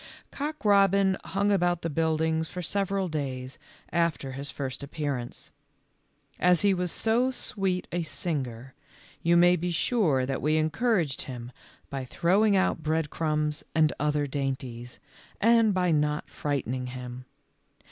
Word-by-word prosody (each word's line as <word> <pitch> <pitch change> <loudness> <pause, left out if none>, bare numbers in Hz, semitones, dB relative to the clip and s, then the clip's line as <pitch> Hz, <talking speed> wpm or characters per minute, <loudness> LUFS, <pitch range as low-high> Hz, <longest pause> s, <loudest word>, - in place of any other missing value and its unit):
Cock 300 -2 -5
robin 195 -1 +4
huns; 200 +1 0
about 175 -2 +1
the 165 - -1
buildings 160 +1 0
for 180 0 -5
several 195 +1 -1
days 135 -5 -4 0.3
after 170 -5 0
his 140 +2 -4
first 135 -2 -4
appearance. 140 -4 -4 0.9
As 180 -1 +4
he 200 -1 +5
was 180 -2 -1
so 235 +3 +2
sweet 195 -7 -1
a 175 - -1
singer 130 -7 -3 0.5
you 170 +1 +4
may 175 +1 +6
be 180 +1 -2
sure 165 - +2
that 135 0 -3
we 155 +2 +2
encouraged 160 - +1
him 120 -1 -7 0.4
by 135 -1 -3
throwing 195 - +2
out 185 -3 +1
bread 155 -1 -1
crumbs 150 -1 -1
and 155 -2 +4
other 150 0 +1
dainties, 130 -4 -4 0.4
and 230 0 +5
by 180 -2 +1
not 150 -1 0
frightening 130 -3 -2
him. 125 0 -7
160 Hz, 135 wpm, -27 LUFS, 140-185 Hz, 0.9 s, may